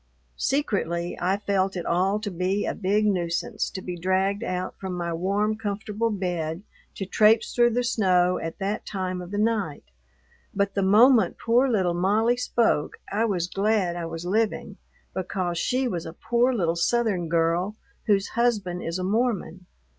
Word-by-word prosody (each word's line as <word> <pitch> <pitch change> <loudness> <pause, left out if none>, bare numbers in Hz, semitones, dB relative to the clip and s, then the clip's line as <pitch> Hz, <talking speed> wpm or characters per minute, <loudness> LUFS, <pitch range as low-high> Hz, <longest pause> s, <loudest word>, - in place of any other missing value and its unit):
Secretly, 185 - -1
I 185 +3 +1
felt 195 -2 0
it 175 - -4
all 190 +4 +1
to 205 -2 -4
be 185 +3 -1
a - - -1
big 205 +2 +1
nuisance 175 -4 -1
to 190 - -7
be 180 - -4
dragged 190 +3 0
out 185 0 -3
from 190 -1 -4
my 170 -1 -3
warm, 200 +5 0
comfortable 215 +1 -2
bed 175 -4 -3 0.3
to 195 - -4
traipse 215 +4 +3
through 240 -1 +4
the 245 - +1
snow 185 -6 +2
at 165 0 -5
that 200 +1 -2
time 185 -2 -3
of 175 - -8
the 205 - -4
night. 210 - 0 0.7
But 200 0 0
the 200 - 0
moment 215 +1 +5
poor 245 +3 +2
little 190 -7 +1
Molly 210 +7 +2
spoke 235 -10 0
I 215 +3 +1
was 185 -6 0
glad 195 -1 0
I 170 -1 -4
was 165 +1 -6
living, 215 +4 -1 0.4
because 180 -2 -2
she 255 +6 0
was 175 -8 -3
a 160 - -7
poor 240 +7 +1
little 170 -9 0
Southern 190 -2 +1
girl 170 +4 +1 0.3
whose 200 -2 +2
husband 210 -7 0
is 165 +2 -3
a 185 - -3
Mormon. 195 -4 -1
195 Hz, 170 wpm, -25 LUFS, 175-215 Hz, 0.7 s, moment